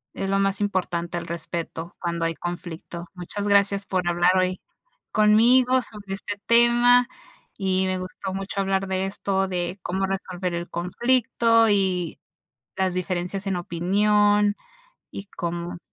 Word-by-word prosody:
Es 195 Hz, -, -3 dB
lo 195 Hz, 0 st, +2 dB
más 195 Hz, 0 st, +1 dB
importante 175 Hz, -4 st, -2 dB
el 170 Hz, -, -5 dB
respeto 170 Hz, 0 st, -5 dB
cuando 170 Hz, -1 st, -2 dB
hay 165 Hz, 0 st, -1 dB
conflicto. 175 Hz, 0 st, -6 dB
Muchas 195 Hz, +3 st, -5 dB
gracias 200 Hz, 0 st, +3 dB
por 185 Hz, -3 st, -1 dB
hablar 175 Hz, +1 st, +3 dB
hoy 185 Hz, 0 st, +1 dB, 0.5 s
conmigo 245 Hz, +5 st, +5 dB
sobre 205 Hz, -4 st, -7 dB
este 205 Hz, +1 st, -6 dB
tema, 240 Hz, +1 st, +5 dB, 0.5 s
y 190 Hz, -1 st, +1 dB
me 185 Hz, -, 0 dB
gustó 185 Hz, +1 st, -6 dB
mucho 195 Hz, +1 st, -4 dB
hablar 195 Hz, 0 st, 0 dB
de 190 Hz, 0 st, -1 dB
esto 195 Hz, 0 st, -1 dB
de 180 Hz, 0 st, -3 dB
cómo 190 Hz, +2 st, -1 dB
resolver 185 Hz, -2 st, -3 dB
el 170 Hz, 0 st, -4 dB
conflicto 230 Hz, +4 st, +2 dB
y 185 Hz, -4 st, 0 dB, 0.6 s
las 190 Hz, -1 st, 0 dB
diferencias 185 Hz, +2 st, -3 dB
en 195 Hz, -2 st, 0 dB
opinión, 205 Hz, +4 st, +2 dB, 0.5 s
y 195 Hz, -, -8 dB
cómo 170 Hz, -2 st, -5 dB
190 Hz, 140 wpm, -24 LUFS, 175-205 Hz, 0.6 s, conmigo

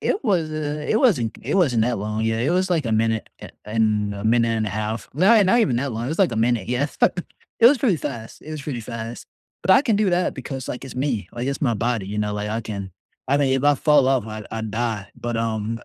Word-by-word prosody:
It 390 Hz, -, -1 dB
was, 175 Hz, -8 st, +1 dB
uh, 150 Hz, -1 st, -3 dB
it 220 Hz, -, +3 dB
wasn't 145 Hz, -, +2 dB
it -, -, -2 dB
wasn't 130 Hz, -, +3 dB
that 120 Hz, -2 st, 0 dB
long. 105 Hz, +2 st, -3 dB
Yeah, 110 Hz, 0 st, 0 dB
it 125 Hz, +6 st, +1 dB
was, 185 Hz, +1 st, +1 dB
like, 160 Hz, -7 st, +1 dB
a 110 Hz, -, 0 dB
minute 110 Hz, 0 st, 0 dB
a -, -, -9 dB, 0.2 s
and 105 Hz, -2 st, +1 dB
a 100 Hz, -, -7 dB
minute 115 Hz, +1 st, +3 dB
and 110 Hz, -1 st, 0 dB
a 105 Hz, -, -3 dB
half. 110 Hz, +2 st, -3 dB
Not 205 Hz, +6 st, +5 dB
not 215 Hz, +6 st, +4 dB
even 130 Hz, -, +2 dB
that 135 Hz, 0 st, -2 dB
long. 115 Hz, +2 st, -3 dB
It -, -, -3 dB
was 160 Hz, -, -3 dB
like 190 Hz, -9 st, +3 dB
a -, -, -3 dB
minute, 115 Hz, -3 st, +1 dB
yeah. 125 Hz, +3 st, +1 dB, 0.7 s
It 230 Hz, -, +9 dB
was 280 Hz, +4 st, +7 dB
pretty 225 Hz, -8 st, +2 dB
fast, 110 Hz, -2 st, -6 dB
it 155 Hz, -, -10 dB
was 155 Hz, -2 st, -5 dB
pretty 135 Hz, -5 st, -4 dB
fast, 115 Hz, 0 st, -7 dB, 0.4 s
but 190 Hz, -, +1 dB
I 190 Hz, -, +7 dB
can 235 Hz, -6 st, +1 dB
do 210 Hz, -1 st, +2 dB
that 175 Hz, +1 st, +1 dB
because, 130 Hz, 0 st, -6 dB
like, 125 Hz, -, -5 dB
it's 130 Hz, -, -9 dB
me, 125 Hz, -8 st, -2 dB
like, 120 Hz, +1 st, -4 dB
it's 140 Hz, 0 st, -2 dB
my 120 Hz, -6 st, +1 dB
body, 110 Hz, -2 st, -1 dB
you 105 Hz, -, -5 dB
know, 105 Hz, 0 st, -1 dB
like 105 Hz, 0 st, -3 dB
I 110 Hz, +2 st, -2 dB
can 100 Hz, -3 st, -6 dB, 0.4 s
I 140 Hz, -, +3 dB
mean, 140 Hz, -2 st, +2 dB
if 135 Hz, -, 0 dB
I 145 Hz, 0 st, +5 dB
fall 145 Hz, -2 st, +4 dB
off 130 Hz, -5 st, +1 dB
I 110 Hz, 0 st, -6 dB
I 115 Hz, 0 st, -4 dB
die, 110 Hz, -1 st, -3 dB
but, 120 Hz, -1 st, -3 dB
um, 115 Hz, 0 st, -2 dB
120 Hz, 265 wpm, -22 LUFS, 110-150 Hz, 0.7 s, It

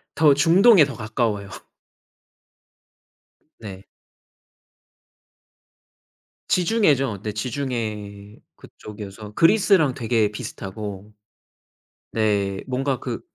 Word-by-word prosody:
더 150 Hz, -2 st, +5 dB
중동에 170 Hz, -, +5 dB
더 135 Hz, -4 st, -7 dB
가까워요. 110 Hz, -2 st, -2 dB, 2.1 s
네. 100 Hz, -3 st, -9 dB, 2.6 s
지중해죠. 150 Hz, -, +1 dB
네 105 Hz, -, -4 dB
지중해 105 Hz, -4 st, -5 dB, 0.2 s
그쪽이어서 105 Hz, 0 st, -11 dB
그리스랑 165 Hz, -, +3 dB
되게 115 Hz, -4 st, 0 dB
비슷하고 105 Hz, 0 st, -8 dB, 1.0 s
네. 100 Hz, -3 st, -1 dB
뭔가 130 Hz, 0 st, -1 dB
그 -, -, -5 dB
110 Hz, 165 characters per minute, -22 LUFS, 105-140 Hz, 2.6 s, 더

